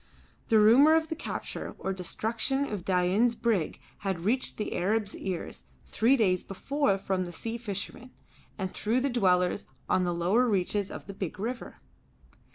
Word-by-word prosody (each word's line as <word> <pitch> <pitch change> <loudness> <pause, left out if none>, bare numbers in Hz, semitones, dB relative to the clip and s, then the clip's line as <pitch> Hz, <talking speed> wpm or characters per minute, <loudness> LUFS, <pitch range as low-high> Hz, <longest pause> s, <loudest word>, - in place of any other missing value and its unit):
The 225 - +4
rumour 260 +9 +7
of 320 -1 +1
the 320 - -2
capture 315 - -5
or 190 - -2
destruction 225 +8 -1
of 210 -8 -4
Dain's 190 +6 +2
brig 220 -9 0 0.2
had 190 -4 -3
reached 250 +5 0
the 210 - -3
Arab's 205 +3 0
ears 185 -3 -5 0.2
three 235 +6 +3
days 185 -6 +2
before 275 +2 0
from 190 -1 -1
the 175 - -7
sea 230 +6 -5
fishermen 225 +3 -5 0.5
and 190 -2 -3
through 230 +4 0
the 280 - +1
dwellers 185 -4 +2 0.2
on 185 - +2
the 175 - 0
lower 190 +9 +2
reaches 200 0 0
of - - -8
the 195 -3 -4
river. 240 +5 -5
210 Hz, 160 wpm, -29 LUFS, 185-240 Hz, 0.5 s, rumour